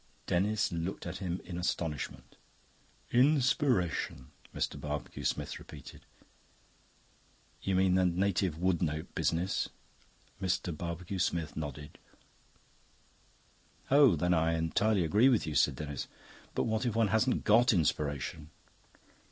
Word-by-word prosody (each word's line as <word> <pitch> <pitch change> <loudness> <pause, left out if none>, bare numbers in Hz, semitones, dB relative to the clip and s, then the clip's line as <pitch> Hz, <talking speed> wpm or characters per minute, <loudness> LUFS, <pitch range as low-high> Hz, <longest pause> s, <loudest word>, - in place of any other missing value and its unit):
Denis 105 +4 +1
looked 85 +3 -4
at - - -5
him 90 -2 -3
in 90 -2 -5
astonishment. 80 -4 -3 0.8
"Inspiration..." 125 - +2 0.2
Mr. - - -3
Barbecue 75 0 -5
Smith - - -2
repeated. - - -12 1.5
"You 95 - 0
mean 95 0 +3
the 95 0 +3
native 90 -2 0
wood 90 0 +1
note 80 -2 -2
business?" 90 +4 0 0.7
Mr. 90 -2 -1
Barbecue 85 +3 -5
Smith 85 -4 -1
nodded. 75 -1 -6 1.9
"Oh, 140 - +7
then 90 +3 +1
I 80 0 +2
entirely 95 +5 +1
agree 105 +11 +4
with 120 -7 +2
you," 80 - -3
said 70 - +3
Denis. 70 -3 -5 0.5
"But - - +1
what 110 -1 0
if 120 -4 -1
one 115 -2 +3
hasn't 110 +5 +2
got 120 +5 +5
Inspiration?" 75 - -1
90 Hz, 120 wpm, -31 LUFS, 80-105 Hz, 1.9 s, Oh